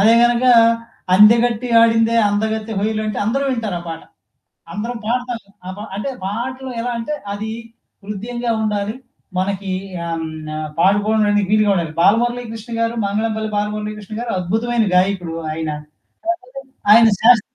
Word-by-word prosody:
అదే 225 +3 +6
గనకా 240 +1 +4 0.6
'అందెగట్టి 230 +3 +5
ఆడిందే 230 0 +4
అందగత్తె 220 +2 -1
హోయలు' 215 +1 -1
అంటే 215 - -3
అందరూ 265 +6 0
వింటారు 225 -7 -2
ఆ - - -10
పాట. 165 0 -6 0.7
అందరం 235 +4 -4
పాడతాము 240 -2 -3 0.2
ఆ - - -3
పా 205 - -7
అంటే 245 +7 -3
పాటలు 255 +6 -4
ఎలా 245 - -2
అంటే, 230 +6 -3 0.2
అది 215 +2 -4 0.5
హృద్యంగా 235 +4 -4
ఉండాలి. 210 0 -1 0.4
మనకీ 195 0 -2 0.3
ఆహ్, 170 - -3
హ్మ్, 160 - -3 0.2
న - - -5 0.3
పాడుకోడానికి 205 +2 +3
వీలుగా 215 -1 +4
ఉండాలి. 170 -4 -2
'బాలమురళీకృష్ణ' 230 +2 0
గారు, 230 0 0
'మంగళంపల్లి 215 +2 -1
బాలమురళీకృష్ణ' 210 0 -4
గారు 240 -1 -4
అద్భుతమైన 225 +5 0
గాయకుడు 180 -3 +1 0.2
ఆయన. 160 0 -3 1.0
కాకపోతే 265 -5 -13
ఆయన 225 +1 +8
శాస్ 235 -1 +6
220 Hz, 135 wpm, -19 LUFS, 205-235 Hz, 1.0 s, ఆయన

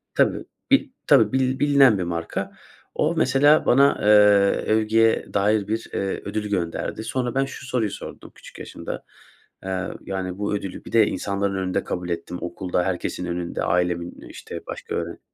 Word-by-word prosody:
Tabii, - - +2 0.3
bir 275 +1 +4 0.2
tabii, 115 -7 +5
bil 130 0 +1
bilinen 140 -6 +5
bir 90 - -2
marka. 85 -1 -4 0.4
O - - +1
mesela 145 +4 +4
bana, 140 +3 +4
eee, - - 0 0.7
övgüye 110 +1 +2
dair 100 0 +2
bir, 110 +2 -3
eee, 95 0 -2
ödül 105 +1 -3
gönderdi. 90 +3 -2
Sonra 125 +1 -2
ben 135 0 +2
şu 135 -1 -9
soruyu 120 -5 -1
sordum - - -9
küçük - - -14
yaşımda; - - -7 0.6
eee, 95 0 -3
yani 95 -1 -4
bu 105 0 -2
ödülü, 100 -2 -6
bir - - -10
de 110 -2 +5
insanların 100 0 -2
önünde 95 -1 -1
kabul 90 0 -4
ettim 85 +1 -4
okulda, 90 +1 -2
herkesin 90 -1 -3
önünde, 85 0 -3
ailemin, 90 -1 -1
işte, - - -8
başka - - -6
öğren 85 0 -4
100 Hz, 160 wpm, -23 LUFS, 90-120 Hz, 0.7 s, tabii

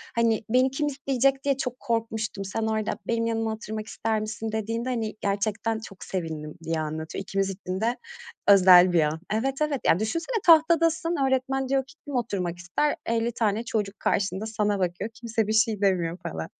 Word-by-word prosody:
Hani, 230 -1 +2
beni 255 +2 +3
kim 295 +2 -1
isteyecek 270 -1 +1
diye 275 -2 +1
çok 250 -2 -4
korkmuştum. 220 -3 -2
Sen 220 +4 -3
orada 220 -1 0 0.2
'Benim 230 0 0
yanıma 225 -1 -1
oturmak 220 0 -6
ister 220 -1 -1
misin?' 215 +1 -4
dediğinde 225 +3 -2
hani, 225 -4 -2
gerçekten 210 +2 -1
çok 195 -6 -11
sevindim." 160 -4 -5
diye 165 -1 -1
anlatıyor. 155 +4 -4
İkimiz 195 +1 -1
için 190 0 -5
de 235 +2 +1 0.5
özel 185 -2 +8
bir 165 - +5
an. 155 +1 0
Evet, 265 +5 0
evet. 295 -4 0
Ya, 170 - +4
düşünsene, 330 - -2
tahtadasın, 330 0 +4
öğretmen 265 0 0
diyor 270 -1 +2
ki: 310 - -16
"Kim 285 -2 -5
oturmak 190 -8 -2
ister?" 180 +12 0
50 230 +1 0
tane 220 -1 0
çocuk 210 -3 -2
karşında 195 +1 0
sana 210 -2 0
bakıyor, 180 +4 -2
kimse 225 -2 -2
bir 215 - 0
şey 220 -2 +2
demiyor 175 -4 +1
falan. 80 0 -5
220 Hz, 175 wpm, -26 LUFS, 195-250 Hz, 0.5 s, özel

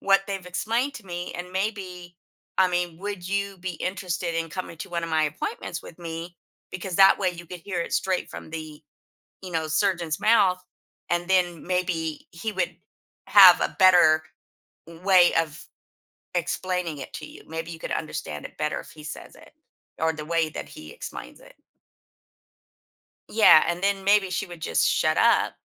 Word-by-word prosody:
what 195 0 +4
they've 195 -2 -4
explained 230 +9 -1
to 215 - -10
me, 175 0 -5
and 180 +1 -7
maybe, 185 -3 -4 0.4
I 190 -1 +5
mean, 175 -2 -1
would 200 -2 -5
you 200 -1 -2
be 180 0 -4
interested 180 0 -3
in 165 0 -2
coming 170 -1 -6
to 195 - -7
one 170 -1 -2
of 165 - -6
my 155 -1 +2
appointments 155 +3 -4
with 165 - -12
me? 170 +1 -7 0.4
Because 185 -1 -4
that 195 0 +7
way 185 -2 +1
you 175 0 -10
could 180 0 -9
hear 180 -1 -3
it - - -4
straight 190 -1 0
from - - -9
the, 155 -2 -8 0.6
you 185 - -7
know, 160 -1 -1
surgeon's 170 -2 0
mouth 190 -5 +4 0.5
and 175 +1 0
then 175 -3 +1
maybe 175 -4 -2
he 210 +6 -5
would 190 - -2 0.5
have - - +9
a - - -1
better 175 -5 +6 0.8
way 185 -3 +6
of 155 -2 -6 0.7
explaining 175 -2 -2
it 135 - -8
to 155 -4 -6
you. - - -13
Maybe 165 +1 -5
you 165 - -8
could - - -5
understand 75 - -4
it - - -19
better 150 0 -1
if - - -13
he 155 -1 -13
says 150 - -8
it, - - -16 0.5
or 160 0 +2
the 155 -1 -7
way 165 0 +1
that - - -7
he 310 0 -11
explains 480 - -9
it. - - -17 1.8
Yeah, 215 -8 +7
and 175 +1 -1
then 195 -1 +1
maybe 200 -1 +4
she 205 +3 -2
would 175 -2 -11
just 85 - +1
shut - - +2
up - - +3
175 Hz, 180 wpm, -25 LUFS, 165-190 Hz, 1.8 s, have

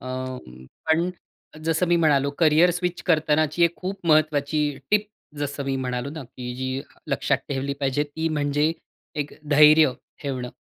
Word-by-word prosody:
अं, 130 - -7 0.2
पण 170 +3 +2 0.5
जसं 165 +2 +1
मी 175 - +4
म्हणालो 140 -4 +3
करियर 165 +2 +5
स्विच 180 0 -2
करतानाची 155 0 +3
एक 170 - +1
खूप 190 -1 -6
महत्वाची 155 -1 +2 0.3
टिप 210 0 +2 0.3
जसं 145 -1 -3
मी 135 0 -1
म्हणालो 125 +1 -3
ना, 155 -2 -7
की 125 0 -7
जी 130 +1 -3 0.3
लक्षात - - +1
ठेवली 140 0 -2
पाहिजे, 135 +1 +1
ती 160 +3 -3
म्हणजे 150 +1 +1 0.4
एक 150 -1 -3 0.2
धैर्य 150 -1 +7 0.3
ठेवणं 130 -3 -4
150 Hz, 145 wpm, -24 LUFS, 135-160 Hz, 0.5 s, धैर्य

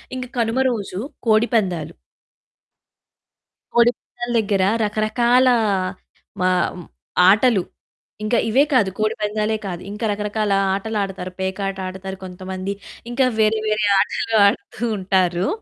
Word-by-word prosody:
ఇంకా 255 -1 -5
కనుమ 230 +2 +1
రోజు 200 -5 -4 0.3
కోడిపందాలు. 215 - +1 1.8
కోడిపందాల 240 0 +1
దగ్గర 200 -3 +1 0.2
రకరకాల 235 +4 +2 0.9
మా 185 - +3 0.8
ఆటలు. 210 -1 +4 0.6
ఇంకా 225 +3 +1
ఇవే 260 +6 +5
కాదు 225 -7 +4
కోడిపందాలే 215 0 0
కాదు, 175 -2 -5
ఇంకా 210 +2 -4
రకరకాల 210 0 -2 0.2
ఆటలాడతారు. 195 -3 -3
పేకాటాడతారు 190 0 -4
కొంతమంది, 185 +1 -5 0.4
ఇంకా 260 +2 +2
వేరే, 220 0 +3
వేరే 215 0 +1
ఆటలు 225 +3 0
ఆడుతూ 200 +3 -1
ఉంటారు. 185 -1 +1
210 Hz, 95 wpm, -21 LUFS, 190-225 Hz, 1.8 s, ఇవే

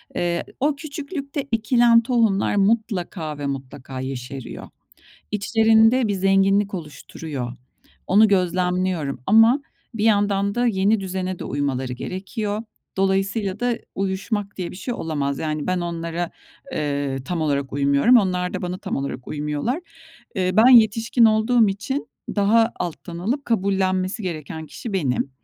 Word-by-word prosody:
Eee, 170 -1 0
ı - - -18
o 290 +2 +1
küçüklükte 280 -1 -5
ekilen 230 +1 +4
tohumlar 225 -5 +1
mutlaka 195 -7 0
ve 145 - -5
mutlaka 135 -1 -6
yeşeriyor. 130 -1 -6 0.6
İçlerinde 225 +3 +4
bir 205 - 0
zenginlik 195 +1 +2
oluşturuyor. 150 -4 -6 0.5
Onu 215 +3 +5
gözlemliyorum 180 -5 0
ama 225 +6 +5 0.3
bir 215 -1 -1
yandan 200 -2 +2
da 245 +1 +1
yeni 205 0 +2
düzene 185 -1 -3
de - - -6
uymaları 135 -2 -2
gerekiyor. 205 - -4 0.3
Dolayısıyla 195 +1 0
da 245 -1 0 0.2
uyuşmak 195 +2 -2
diye 180 -2 -4
bir - - -10
şey 240 +5 -4
olamaz. 145 - -2
Yani, 155 -1 -3
ben 185 0 0
onlara, 170 0 -3 0.4
eee, 140 -2 -1
tam 175 +1 -3
olarak 140 -3 -1
uymuyorum. 140 - +4
Onlar 180 -4 +1
da - - -3
bana 180 +1 -3
tam - - -4
olarak 135 -2 -5
uymuyorlar. 150 - -2 0.6
Eee, 185 -1 +1
ben 220 +5 +6
yetişkin 230 0 +5
olduğum 220 +1 +4
için 205 +9 -3 0.3
daha 225 +3 +4
alttan 170 0 -5
alıp 240 +11 -2
kabullenmesi 190 -2 0
gereken 160 -2 -5
kişi 215 +7 -7
benim. 140 -7 0
190 Hz, 135 wpm, -22 LUFS, 160-220 Hz, 0.6 s, ben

